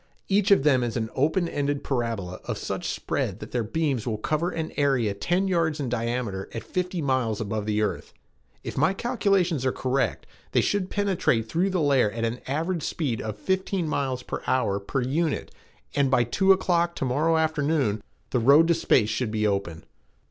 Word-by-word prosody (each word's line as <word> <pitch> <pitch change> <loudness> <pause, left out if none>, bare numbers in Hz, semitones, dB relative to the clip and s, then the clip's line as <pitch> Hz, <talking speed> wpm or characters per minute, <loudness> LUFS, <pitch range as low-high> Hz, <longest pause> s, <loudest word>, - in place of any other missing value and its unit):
Each 200 0 +2
of 200 -8 +5
them 135 -4 +4
is 120 0 -2
an 110 -1 -2
opened 145 -1 0
parabola 115 -8 -2
of - - -3
such - - -4
spread - - -2
that - - -9
their 120 -2 0
beams 135 0 -1
will 110 -2 -1
cover 155 +10 -1
an 160 -2 -4
area 135 -7 +2
ten 175 - 0
yards 165 -4 +1
in 135 -4 -2
diameter 115 -4 -2
at 115 - -4
fifty 180 -2 -2
miles 130 -6 0
above 110 0 -3
the 105 0 +1
earth. 105 - -3 0.5
If - - -5
my 155 +7 +3
calculations 195 - +1
are 130 - +2
correct 130 +2 -1 0.3
they - - +4
should 200 -2 0
penetrate 185 - +1
through 175 +9 +1
the 185 -3 0
layer 135 -7 +3
at 115 +2 -3
an 115 +2 -2
average 165 +5 -1
speed 140 -7 -2
of 110 -1 -5
fifteen 190 - -1
miles 130 -4 -1
per - - -5
hour 120 -6 +1
per 100 +7 -2
unit, 150 +4 -1 0.4
and 140 -2 +2
by 130 -2 +4
two 190 - +3
o'clock 175 -2 +2
to - - -2
morrow 155 +6 +2
afternoon, 150 -8 +1 0.3
the 125 - +2
road 145 +8 +6
to - - +6
space 130 -9 +2
should 110 +2 -1
be 110 0 -1
open." 100 -5 -1
135 Hz, 185 wpm, -26 LUFS, 115-165 Hz, 0.5 s, road